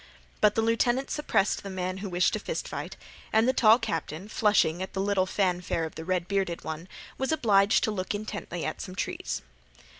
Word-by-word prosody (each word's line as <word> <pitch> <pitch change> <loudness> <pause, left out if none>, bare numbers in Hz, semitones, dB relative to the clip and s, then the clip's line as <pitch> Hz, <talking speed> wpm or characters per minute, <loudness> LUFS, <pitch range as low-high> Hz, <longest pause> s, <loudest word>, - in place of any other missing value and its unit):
But 210 -1 +4
the 225 - +2
lieutenant 240 +3 +1
suppressed 220 -9 +1
the 200 - -7
man 185 0 -3
who 195 0 -5
wished 180 0 +2
to - - 0
fist - - -4
fight, - - -6 0.3
and 220 +2 +4
the 260 - +4
tall 225 -3 +6
captain, 190 - -4
flushing 205 -6 +2
at 190 - -5
the 190 - -3
little 195 -1 +1
fanfare 180 -4 0
of 160 - -7
the 160 - -7
red 180 0 -1
bearded 195 -3 -1
one, 160 +2 -5 0.3
was 265 +2 0
obliged 205 -8 +4
to 220 - +1
look 185 0 -2
intently 205 -5 -5
at - - -3
some 185 - -7
trees. - - -3
195 Hz, 200 wpm, -28 LUFS, 180-220 Hz, 0.3 s, tall